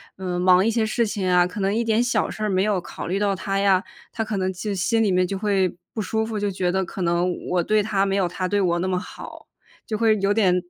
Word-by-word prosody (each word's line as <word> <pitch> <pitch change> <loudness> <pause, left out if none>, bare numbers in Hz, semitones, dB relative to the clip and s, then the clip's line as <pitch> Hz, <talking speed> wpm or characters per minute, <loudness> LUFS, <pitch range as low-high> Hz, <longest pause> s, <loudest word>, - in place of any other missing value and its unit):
嗯， 180 -2 -3
忙 185 +2 +5
一 225 - +2
些 225 -1 +1
事 235 +2 0
情 205 -3 -2
啊， 180 -1 +5
可 180 +3 -6
能 195 +1 0
一 235 - +1
点 225 0 +2
小 245 +1 0
事 215 - -6
儿 210 - 0
没 185 0 +2
有 205 -2 +1
考 175 - -8
虑 190 +3 -1
到 200 -1 +1
她 195 +1 -2
呀， 195 -1 +3 0.3
她 225 - -1
可 215 -2 -3
能 190 0 -1
就 200 +3 -4
心 225 +4 +1
里 205 - +2
面 180 0 +2
就 195 - -3
会 195 -3 0 0.2
不 220 - -3
舒 220 +3 -1
服， 220 -1 -4
就 205 0 0
觉 185 -2 -1
得 190 0 0
可 190 - -7
能 175 +1 +1 0.2
我 180 -1 +2
对 210 +4 +2
她 200 -2 +1
没 195 0 0
有 195 - +2
她 185 +1 -3
对 205 +2 +1
我 175 -2 +1
那 185 - -1
么 185 - 0
好， 180 - -9 0.4
就 215 - -3
会 220 -1 +3
有 200 +1 +2
点 195 -4 +3
195 Hz, 295 characters per minute, -23 LUFS, 185-215 Hz, 0.4 s, 忙